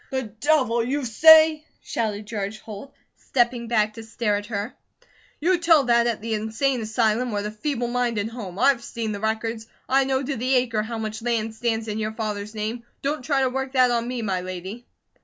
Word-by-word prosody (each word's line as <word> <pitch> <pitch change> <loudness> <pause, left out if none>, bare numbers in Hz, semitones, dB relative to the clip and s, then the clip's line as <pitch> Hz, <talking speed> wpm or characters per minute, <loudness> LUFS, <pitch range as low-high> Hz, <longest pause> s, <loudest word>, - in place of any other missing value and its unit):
"The 260 -1 -2
Devil, 235 +1 +1
you 270 +3 -2
say!" 315 +5 +7 0.2
shouted 215 -2 -3
George 205 -1 -4
Holt, 215 +6 -10 0.3
stepping 240 -2 0
back 215 -2 +1
to 225 - -9
stare 220 -1 -1
at 205 0 -4
her. 210 +1 -4 0.7
"You 350 +3 +2
tell 330 -4 +5
that 235 -1 +3
at 230 -3 -1
the 225 0 -3
Insane 220 +4 -1
Asylum 225 +2 0
or 205 -1 -2
the 210 - -4
Feeble 245 +2 -2
Minded 235 -3 -1
Home! 210 -6 -8
I've 255 0 +3
seen 230 -2 -4
the 205 - -4
records! 220 +1 -2 0.2
I 270 +1 +3
know 265 0 0
to 275 +1 -2
the 255 +2 +1
acre 235 -4 +1
how 225 +2 -5
much 220 0 -4
land 225 -2 -1
stands 225 -1 -2
in 215 0 -3
your 215 0 -2
father's 215 -1 -4
name. 220 +3 -3 0.2
Don't 290 +1 -1
try 275 -1 +1
to 260 - +2
work 265 +1 -3
that 255 -2 +4
on 235 0 0
me, 245 -2 -3
my 190 -3 -1
lady." 185 +6 -7
230 Hz, 200 wpm, -24 LUFS, 215-255 Hz, 0.7 s, say